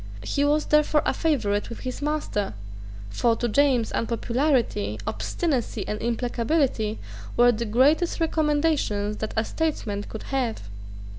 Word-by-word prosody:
He 285 Hz, -, 0 dB
was 300 Hz, +1 st, +2 dB
therefore 300 Hz, 0 st, +3 dB
a -, -, +2 dB
favourite 225 Hz, -11 st, 0 dB
with 235 Hz, -, -8 dB
his 255 Hz, +1 st, -5 dB
master: 290 Hz, -, -2 dB, 0.6 s
for 230 Hz, -, +2 dB
to 240 Hz, -, -1 dB
James 250 Hz, -1 st, +2 dB
unpopularity, 235 Hz, -, 0 dB
obstinacy, 285 Hz, -9 st, -2 dB
and 210 Hz, -, -3 dB
implacability 235 Hz, -1 st, 0 dB, 0.4 s
were 245 Hz, 0 st, +6 dB
the 235 Hz, 0 st, -2 dB
greatest 285 Hz, +12 st, +3 dB
recommendations 295 Hz, -10 st, +1 dB
that 220 Hz, -, -4 dB
a 220 Hz, -, +2 dB
statesman 230 Hz, -11 st, -2 dB
could 220 Hz, -, -7 dB
have. 245 Hz, -, -1 dB
245 Hz, 130 wpm, -25 LUFS, 220-300 Hz, 0.6 s, were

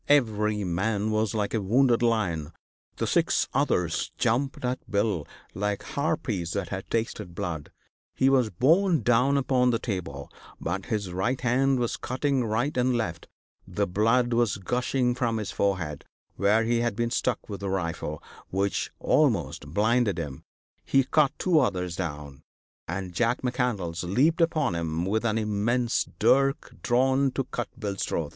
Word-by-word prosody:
Every 105 Hz, -7 st, +2 dB
man 100 Hz, +4 st, 0 dB
was 110 Hz, 0 st, 0 dB
like 105 Hz, -2 st, -1 dB
a 110 Hz, -, +1 dB
wounded 120 Hz, +4 st, +3 dB
lion; 90 Hz, -10 st, 0 dB, 0.4 s
the -, -, -2 dB
six -, -, +2 dB
others -, -, 0 dB
jumped 130 Hz, +3 st, 0 dB
at 125 Hz, +1 st, -1 dB
Bill 100 Hz, -6 st, 0 dB, 0.3 s
like 100 Hz, +1 st, -2 dB
harpies 120 Hz, -, -2 dB
that 100 Hz, -4 st, -3 dB
had 95 Hz, -1 st, -5 dB
tasted 110 Hz, -6 st, -3 dB
blood. 85 Hz, -7 st, -4 dB, 0.4 s
He 130 Hz, -, +3 dB
was 130 Hz, -4 st, +4 dB
borne 165 Hz, -, +3 dB
down 125 Hz, +5 st, +3 dB
upon 130 Hz, -2 st, +2 dB
the 120 Hz, -, +2 dB
table, 85 Hz, -, -5 dB, 0.3 s
but 90 Hz, +3 st, -3 dB
his 100 Hz, -5 st, -2 dB
right 115 Hz, +8 st, 0 dB
hand 130 Hz, +2 st, +2 dB
was 120 Hz, -2 st, -1 dB
cutting 130 Hz, 0 st, -1 dB
right 115 Hz, +6 st, -1 dB
and 125 Hz, -1 st, +2 dB
left; 85 Hz, -8 st, -3 dB, 0.4 s
the -, -, -1 dB
blood 115 Hz, +6 st, +2 dB
was 115 Hz, -5 st, +2 dB
gushing 125 Hz, +5 st, 0 dB
from 120 Hz, -3 st, -1 dB
his 105 Hz, -2 st, -3 dB
forehead, 90 Hz, -8 st, -1 dB, 0.3 s
where 105 Hz, +3 st, +3 dB
he 115 Hz, +1 st, +1 dB
had 120 Hz, -3 st, 0 dB
been 120 Hz, +1 st, -1 dB
struck 125 Hz, 0 st, -1 dB
with 100 Hz, -2 st, -6 dB
a 100 Hz, -, -2 dB
rifle, 85 Hz, -5 st, -3 dB, 0.3 s
which 100 Hz, +1 st, -1 dB
almost 90 Hz, -, +1 dB
blinded 105 Hz, +4 st, +2 dB
him; 75 Hz, -6 st, -5 dB, 0.4 s
he 135 Hz, -, +3 dB
cut 145 Hz, +1 st, +3 dB
two 175 Hz, -4 st, +3 dB
others 90 Hz, -, 0 dB
down, 75 Hz, -6 st, -5 dB, 0.5 s
and 90 Hz, +1 st, -4 dB
Jack 120 Hz, +7 st, 0 dB
McCandlas 115 Hz, -10 st, -1 dB
leaped 135 Hz, -, +2 dB
upon 165 Hz, -, +2 dB
him 85 Hz, 0 st, -2 dB
with 110 Hz, +4 st, 0 dB
an 110 Hz, -1 st, +1 dB
immense 115 Hz, +3 st, 0 dB
dirk 135 Hz, +1 st, +2 dB
drawn 130 Hz, +3 st, +2 dB
to 135 Hz, -, -1 dB
cut 120 Hz, -1 st, -4 dB
Bill's 100 Hz, -2 st, -3 dB
throat. 80 Hz, -3 st, -2 dB
110 Hz, 155 wpm, -27 LUFS, 95-125 Hz, 0.5 s, was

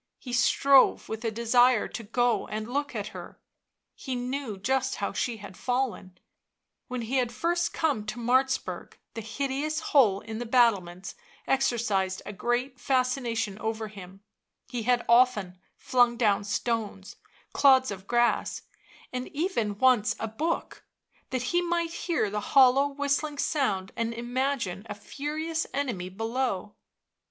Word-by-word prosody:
He 245 Hz, -, -8 dB
strove 270 Hz, +2 st, +4 dB
with 220 Hz, +1 st, -5 dB
a 230 Hz, -, +1 dB
desire 235 Hz, +2 st, +3 dB
to -, -, -6 dB
go 240 Hz, +3 st, 0 dB
and 215 Hz, +1 st, -4 dB
look 285 Hz, +1 st, -2 dB
at 210 Hz, -1 st, -3 dB
her; -, -, -10 dB, 0.5 s
he 260 Hz, -, -5 dB
knew 250 Hz, -3 st, -4 dB
just 260 Hz, +6 st, 0 dB
how 200 Hz, -, -3 dB
she 230 Hz, +3 st, -2 dB
had 200 Hz, -3 st, -11 dB
fallen... 245 Hz, -8 st, -2 dB, 0.7 s
when 250 Hz, -2 st, -4 dB
he 250 Hz, +4 st, -1 dB
had 245 Hz, -2 st, +1 dB
first 345 Hz, +1 st, 0 dB
come 280 Hz, -10 st, -1 dB
to 215 Hz, -, -4 dB
Martzburg, 260 Hz, +3 st, 0 dB, 0.2 s
the 225 Hz, -, -5 dB
hideous 275 Hz, +7 st, -2 dB
hole 210 Hz, -9 st, +5 dB
in 220 Hz, 0 st, -6 dB
the 240 Hz, -, -4 dB
battlements 195 Hz, -7 st, +2 dB, 0.3 s
exercised 220 Hz, -8 st, 0 dB
a 205 Hz, -, -6 dB
great 245 Hz, +5 st, -2 dB
fascination 245 Hz, -5 st, 0 dB
over 220 Hz, 0 st, -3 dB
him; 195 Hz, -1 st, -12 dB, 0.4 s
he 245 Hz, -2 st, -4 dB
had 245 Hz, +1 st, +1 dB
often 225 Hz, -7 st, +3 dB, 0.2 s
flung 245 Hz, -2 st, +2 dB
down 210 Hz, -4 st, +2 dB
stones, 205 Hz, -2 st, -3 dB, 0.4 s
clods 260 Hz, -4 st, +5 dB
of 195 Hz, 0 st, -8 dB
grass, 240 Hz, 0 st, +1 dB, 0.5 s
even 255 Hz, -, -2 dB
once 240 Hz, -2 st, +3 dB
a 225 Hz, -, -2 dB
book, 305 Hz, +10 st, -3 dB, 0.5 s
that 255 Hz, -2 st, -2 dB
he 350 Hz, -, +4 dB
might 340 Hz, -1 st, -1 dB
hear 335 Hz, -12 st, -1 dB
the 210 Hz, -, -1 dB
hollow 270 Hz, +3 st, +5 dB
whistling 285 Hz, +1 st, -1 dB
sound 210 Hz, -12 st, 0 dB
and 230 Hz, 0 st, -2 dB
imagine 240 Hz, -5 st, -2 dB
a 205 Hz, -, -4 dB
furious 310 Hz, +8 st, -4 dB
enemy 235 Hz, -11 st, -2 dB
below. 225 Hz, 0 st, -2 dB
240 Hz, 140 wpm, -27 LUFS, 210-265 Hz, 0.7 s, hole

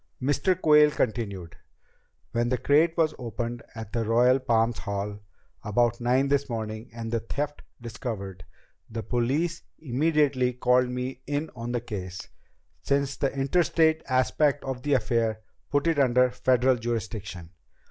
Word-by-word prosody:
Mr. 145 Hz, +7 st, +1 dB
Quayle 150 Hz, -3 st, +6 dB
continued. 100 Hz, -, -3 dB, 0.7 s
"When 120 Hz, 0 st, 0 dB
the 125 Hz, -, +1 dB
crate 160 Hz, +6 st, +3 dB
was 160 Hz, -2 st, +2 dB
opened 120 Hz, 0 st, -4 dB
at 110 Hz, -2 st, -8 dB
the 115 Hz, -1 st, 0 dB
Royal 120 Hz, +4 st, +4 dB
Palms 115 Hz, -2 st, +1 dB
Hall 100 Hz, 0 st, -4 dB, 0.4 s
about 120 Hz, +2 st, +1 dB
nine 130 Hz, +3 st, +2 dB
this 140 Hz, 0 st, +1 dB
morning 110 Hz, 0 st, -5 dB
and 115 Hz, -1 st, -6 dB
the 115 Hz, -, +1 dB
theft 145 Hz, +6 st, -4 dB, 0.2 s
discovered, 110 Hz, -6 st, -6 dB, 0.5 s
the 115 Hz, 0 st, -5 dB
police 145 Hz, +8 st, 0 dB, 0.2 s
immediately 140 Hz, -2 st, +1 dB
called 125 Hz, 0 st, +2 dB
me 125 Hz, +1 st, -4 dB
in 145 Hz, +2 st, -2 dB
on 120 Hz, 0 st, -5 dB
the 120 Hz, -1 st, -1 dB
case, 95 Hz, -5 st, -6 dB, 0.5 s
since 140 Hz, 0 st, 0 dB
the 135 Hz, -, 0 dB
interstate 160 Hz, +3 st, +2 dB
aspect 140 Hz, +3 st, +2 dB
of 130 Hz, -2 st, -4 dB
the 145 Hz, +2 st, 0 dB
affair 115 Hz, -2 st, 0 dB, 0.3 s
put 145 Hz, +1 st, +1 dB
it 165 Hz, -3 st, +2 dB
under 125 Hz, -1 st, +4 dB
Federal 125 Hz, 0 st, +2 dB
jurisdiction. 110 Hz, -7 st, -5 dB
125 Hz, 140 wpm, -26 LUFS, 115-140 Hz, 0.7 s, Quayle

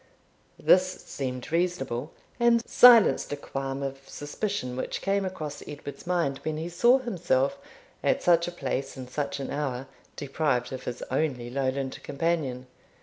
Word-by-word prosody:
This 185 Hz, 0 st, +4 dB
seemed 130 Hz, 0 st, -5 dB
reasonable, 165 Hz, -6 st, -1 dB, 0.3 s
and 235 Hz, -1 st, +3 dB
silenced 240 Hz, -10 st, +7 dB
a -, -, -3 dB
qualm 135 Hz, -1 st, -4 dB
of 135 Hz, 0 st, -4 dB
suspicion 145 Hz, -, -3 dB
which 130 Hz, -, -3 dB
came 200 Hz, 0 st, 0 dB
across 155 Hz, -6 st, -5 dB
Edward's 145 Hz, +2 st, -8 dB
mind 170 Hz, -7 st, 0 dB
when 155 Hz, -1 st, -3 dB
he 165 Hz, +2 st, -4 dB
saw 240 Hz, +9 st, +5 dB
himself, 175 Hz, -, 0 dB, 0.4 s
at -, -, +2 dB
such 170 Hz, -1 st, +4 dB
a -, -, -3 dB
place 135 Hz, -5 st, -3 dB
and 130 Hz, -1 st, -7 dB
such 140 Hz, +2 st, -3 dB
an 135 Hz, -, -4 dB
hour, 135 Hz, -3 st, -2 dB, 0.3 s
deprived 140 Hz, -3 st, -1 dB
of 130 Hz, -, -6 dB
his 125 Hz, -, -4 dB
only 130 Hz, -4 st, -1 dB
Lowland 135 Hz, 0 st, -2 dB
companion. 140 Hz, -4 st, -1 dB
145 Hz, 145 wpm, -27 LUFS, 135-175 Hz, 0.4 s, silenced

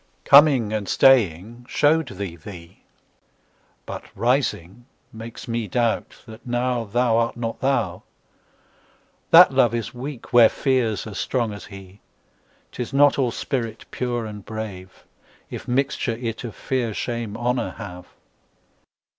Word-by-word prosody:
Coming 140 Hz, -7 st, +6 dB
and 105 Hz, -2 st, -3 dB
staying 120 Hz, -1 st, +3 dB
show'd 155 Hz, +2 st, +2 dB
thee 95 Hz, -4 st, -5 dB
thee; 85 Hz, +1 st, -12 dB, 1.0 s
But -, -, -7 dB
rising 120 Hz, -, -1 dB, 0.3 s
makes 115 Hz, +1 st, -9 dB
me 115 Hz, -2 st, -2 dB
doubt 115 Hz, +3 st, -1 dB
that 110 Hz, +1 st, -13 dB
nowThou 120 Hz, -1 st, 0 dB
art 115 Hz, 0 st, -2 dB
not 115 Hz, -1 st, -4 dB
thou. 135 Hz, +1 st, 0 dB, 1.3 s
That 170 Hz, -3 st, +8 dB
Love 120 Hz, -3 st, +3 dB
is 115 Hz, +2 st, -4 dB
weak 130 Hz, +1 st, -8 dB
where 120 Hz, -2 st, +8 dB
Fear's 125 Hz, -7 st, 0 dB
as 105 Hz, -2 st, -6 dB
strong 120 Hz, -5 st, -1 dB
as 105 Hz, -, -9 dB
he;'Tis 100 Hz, +5 st, -12 dB
not 145 Hz, +1 st, +4 dB
all 130 Hz, -3 st, +2 dB
spirit 115 Hz, -1 st, -4 dB
pure 120 Hz, -2 st, -2 dB
and 105 Hz, -2 st, -8 dB
brave, 100 Hz, -4 st, -8 dB, 0.5 s
If -, -, -7 dB
mixture 135 Hz, -2 st, 0 dB
it 115 Hz, -2 st, -4 dB
of 115 Hz, -3 st, -7 dB
Fear, 120 Hz, -5 st, -2 dB
Shame, 115 Hz, -3 st, -4 dB
Honour 120 Hz, +1 st, -1 dB
have. 90 Hz, -5 st, -9 dB
115 Hz, 125 wpm, -23 LUFS, 105-125 Hz, 1.3 s, That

